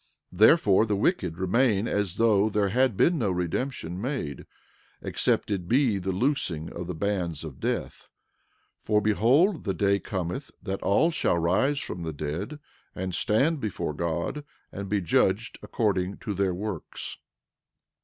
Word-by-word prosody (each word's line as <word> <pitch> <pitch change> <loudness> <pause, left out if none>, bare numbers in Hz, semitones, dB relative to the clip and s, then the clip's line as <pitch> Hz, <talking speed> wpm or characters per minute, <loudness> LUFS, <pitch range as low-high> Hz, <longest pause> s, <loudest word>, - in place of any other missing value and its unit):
11:41 90 - -12
Therefore 110 - +6
the 105 - +1
wicked 105 - 0
remain 105 +3 +2
as 105 -5 -1
though 110 -2 +4
there 105 -2 +1
had 125 0 +2
been 170 -2 +3
no 110 -5 +1
redemption 90 +1 -3
made, 120 - -4 0.5
except - - 0
it 90 -4 -2
be 120 -3 +2
the 95 +1 -2
loosing 95 - -1
of 85 0 -6
the 90 - -4
bands 90 -4 -2
of 75 -5 -8
death; - - -3 0.7
for 105 -1 +2
behold, 130 - +3
the 95 -3 -2
day 100 +3 +2
cometh 95 +9 -4
that 95 -1 -4
all 160 +12 +3
shall 120 - +1
rise 105 - +2
from 90 -9 -5
the 80 -1 -4
dead 75 - -4 0.4
and 95 0 -4
stand 135 - +2
before 90 - -3
God, 85 - -2 0.3
and 100 0 -6
be 105 0 +1
judged 85 - +1
according 100 -3 -1
to 105 - -4
their 95 -2 0
works. 100 -3 -6
100 Hz, 155 wpm, -27 LUFS, 90-115 Hz, 0.7 s, Therefore